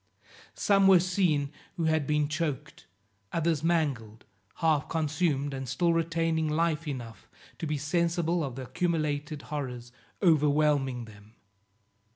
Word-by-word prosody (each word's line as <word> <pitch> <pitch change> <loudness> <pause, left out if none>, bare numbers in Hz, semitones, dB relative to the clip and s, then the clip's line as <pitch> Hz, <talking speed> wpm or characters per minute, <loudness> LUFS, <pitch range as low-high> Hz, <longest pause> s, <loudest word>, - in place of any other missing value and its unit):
Some 195 -1 +4
were 190 -2 +8
seen 170 -6 +1 0.3
who 170 - -1
had 160 -3 +1
been 150 -1 +2
choked, 150 -2 -4 0.4
others 165 -2 0
mangled, 140 -10 -1 0.3
half 155 -3 +1
consumed 155 -3 0
and 135 -2 -5
still 170 +6 +2
retaining 165 -1 0
life 160 0 0
enough 120 -5 -7 0.3
to 165 - -3
be 150 0 -1
sensible 170 +3 0
of 135 -4 -4
the 130 - -6
accumulated 150 +1 -2
horrors 125 -5 -5 0.3
overwhelming 150 - +2
them. 105 0 -16
150 Hz, 125 wpm, -28 LUFS, 140-165 Hz, 0.4 s, were